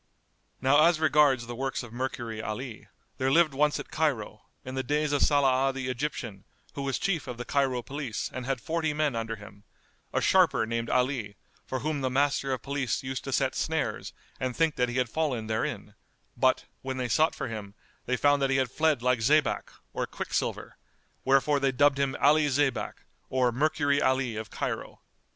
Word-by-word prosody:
[FN#214] -, -, -32 dB
Now 145 Hz, +4 st, +6 dB
as 170 Hz, -2 st, +3 dB
regards 145 Hz, -5 st, +4 dB
the 120 Hz, 0 st, -6 dB
works 135 Hz, +1 st, -2 dB
of 120 Hz, -2 st, -11 dB
Mercury 120 Hz, -3 st, -4 dB
'Alí; 110 Hz, +2 st, -6 dB, 0.3 s
there 130 Hz, -, +2 dB
lived 155 Hz, +1 st, +4 dB
once 150 Hz, +2 st, +2 dB
at -, -, -8 dB
Cairo,[FN#215] 125 Hz, -9 st, -1 dB, 0.3 s
in 130 Hz, -, -6 dB
the 130 Hz, -, -1 dB
days 150 Hz, +3 st, 0 dB
of 145 Hz, -, +1 dB
Saláh 135 Hz, -2 st, +3 dB
the 130 Hz, -1 st, -3 dB
Egyptian, 120 Hz, -6 st, -4 dB, 0.3 s
who 140 Hz, -, -5 dB
was 135 Hz, -1 st, -1 dB
Chief 175 Hz, -8 st, -1 dB
of 125 Hz, -2 st, -5 dB
the 120 Hz, -, -5 dB
Cairo 135 Hz, -3 st, 0 dB
Police 135 Hz, -5 st, -4 dB
and 130 Hz, -, -4 dB
had 135 Hz, -2 st, -1 dB
forty 160 Hz, +1 st, -1 dB
men 150 Hz, -4 st, +1 dB
under 115 Hz, 0 st, -3 dB
him, 100 Hz, -1 st, -14 dB, 0.5 s
a -, -, +1 dB
sharper 110 Hz, -, +4 dB
named 115 Hz, +1 st, -2 dB
Ali, 125 Hz, -5 st, 0 dB, 0.3 s
for 130 Hz, -1 st, -3 dB
whom 150 Hz, -1 st, -2 dB
the 130 Hz, -, 0 dB
Master 140 Hz, +1 st, +1 dB
of 130 Hz, -4 st, -2 dB
Police 140 Hz, -4 st, -2 dB
used 130 Hz, 0 st, -4 dB
to 135 Hz, -, -4 dB
set 135 Hz, 0 st, +1 dB
snares 160 Hz, -3 st, -2 dB, 0.3 s
and 130 Hz, -2 st, -2 dB
think 165 Hz, -2 st, +2 dB
that 125 Hz, -1 st, +1 dB
he 120 Hz, -, -3 dB
had 125 Hz, -1 st, +2 dB
fallen 130 Hz, -4 st, -1 dB
therein; 110 Hz, -2 st, -3 dB, 0.4 s
but, -, -, +2 dB, 0.2 s
when 130 Hz, 0 st, -4 dB
they 125 Hz, -1 st, -1 dB
sought 155 Hz, +8 st, +2 dB
for -, -, -4 dB
him, 105 Hz, -3 st, -7 dB, 0.3 s
they 125 Hz, -, +1 dB
found 145 Hz, +1 st, +3 dB
that 135 Hz, -, +2 dB
he 135 Hz, -, +2 dB
had 130 Hz, -2 st, 0 dB
fled 155 Hz, -6 st, +1 dB
like 125 Hz, -1 st, +2 dB
zaybak, 145 Hz, +4 st, +2 dB, 0.2 s
or -, -, -2 dB
quicksilver, -, -, -3 dB, 0.5 s
wherefore 135 Hz, +2 st, +3 dB
they 135 Hz, -1 st, +2 dB
dubbed 140 Hz, +1 st, +3 dB
him 140 Hz, -1 st, 0 dB
Ali 150 Hz, +1 st, +5 dB
Zaybak 140 Hz, 0 st, -1 dB, 0.2 s
or 125 Hz, -2 st, +2 dB
Mercury 145 Hz, +2 st, +1 dB
Ali 130 Hz, -3 st, +1 dB
of 110 Hz, -1 st, -5 dB
Cairo. -, -, -4 dB
135 Hz, 195 wpm, -28 LUFS, 120-145 Hz, 0.5 s, Now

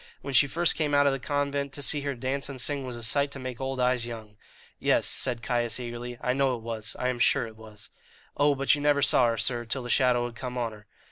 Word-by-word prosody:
When 140 Hz, -, -5 dB
she 140 Hz, +2 st, +6 dB
first 170 Hz, +5 st, +2 dB
came 150 Hz, -2 st, 0 dB
out 145 Hz, 0 st, +5 dB
of 140 Hz, -, +3 dB
the 135 Hz, -, -3 dB
convent, 140 Hz, 0 st, -2 dB
to 145 Hz, -, -5 dB
see 145 Hz, +2 st, +3 dB
her 140 Hz, -1 st, -3 dB
dance 130 Hz, +3 st, -2 dB
and 135 Hz, -2 st, -7 dB
sing 140 Hz, +1 st, -1 dB
was 125 Hz, -, -5 dB
a 120 Hz, -, -6 dB
sight 140 Hz, +6 st, +2 dB
to -, -, -7 dB
make 130 Hz, -1 st, -6 dB
old 135 Hz, 0 st, -3 dB
eyes 125 Hz, -1 st, +2 dB
young." 110 Hz, -3 st, -8 dB, 0.4 s
"Yes," -, -, +2 dB
said 120 Hz, -2 st, 0 dB
Caius 120 Hz, 0 st, -1 dB
eagerly, 120 Hz, 0 st, -6 dB
"I 125 Hz, -, +1 dB
know 135 Hz, -1 st, +1 dB
it 115 Hz, -, -10 dB
was 110 Hz, -1 st, -5 dB
I 125 Hz, -, -1 dB
am 125 Hz, -1 st, -3 dB
sure 120 Hz, +2 st, +3 dB
it 110 Hz, -1 st, -11 dB
was." 110 Hz, -2 st, -12 dB, 0.4 s
"Oh, 145 Hz, 0 st, +3 dB
but 135 Hz, 0 st, +3 dB
you 145 Hz, -, 0 dB
never 145 Hz, -1 st, +3 dB
saw 125 Hz, -, +5 dB
her, 115 Hz, -1 st, 0 dB
sir, 120 Hz, +1 st, 0 dB
till 120 Hz, +3 st, -4 dB
the 120 Hz, -, -3 dB
shadow 125 Hz, -2 st, +3 dB
had 120 Hz, -1 st, -7 dB
come 125 Hz, +1 st, -6 dB
on 120 Hz, -2 st, -1 dB
her." 105 Hz, -1 st, -14 dB
125 Hz, 265 wpm, -27 LUFS, 120-140 Hz, 0.4 s, she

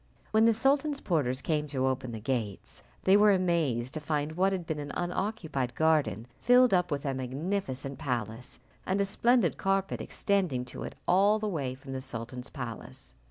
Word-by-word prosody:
When 220 Hz, +1 st, +5 dB
the 230 Hz, -, +5 dB
sultan's 280 Hz, +4 st, +2 dB
porters 130 Hz, -, 0 dB
came 150 Hz, -2 st, 0 dB
to 135 Hz, -2 st, -1 dB
open 130 Hz, -2 st, -1 dB
the 110 Hz, -, -5 dB
gates, 110 Hz, -4 st, -3 dB, 0.2 s
they 190 Hz, -, +5 dB
were 205 Hz, 0 st, +6 dB
amazed 165 Hz, -10 st, +1 dB
to 155 Hz, -, -2 dB
find 150 Hz, 0 st, -1 dB
what 185 Hz, +4 st, +2 dB
had 185 Hz, -3 st, -2 dB
been 160 Hz, -2 st, -3 dB
an 145 Hz, 0 st, -5 dB
unoccupied 175 Hz, -, -2 dB
garden 155 Hz, -, +2 dB
filled 250 Hz, -1 st, +5 dB
up 180 Hz, -1 st, +3 dB
with 145 Hz, -1 st, -3 dB
a 135 Hz, -, 0 dB
magnificent 135 Hz, 0 st, -3 dB
palace, 120 Hz, -1 st, -4 dB, 0.2 s
and 190 Hz, +2 st, 0 dB
a 200 Hz, -, +3 dB
splendid 235 Hz, 0 st, +2 dB
carpet 195 Hz, 0 st, 0 dB
extending 180 Hz, -12 st, 0 dB
to 125 Hz, -, -8 dB
it -, -, -6 dB
all 200 Hz, +4 st, +5 dB
the 215 Hz, 0 st, -2 dB
way 140 Hz, -9 st, -2 dB
from 135 Hz, 0 st, -9 dB
the 130 Hz, -, -3 dB
sultan's 125 Hz, 0 st, -6 dB
palace. -, -, -7 dB
155 Hz, 180 wpm, -29 LUFS, 130-195 Hz, 0.2 s, were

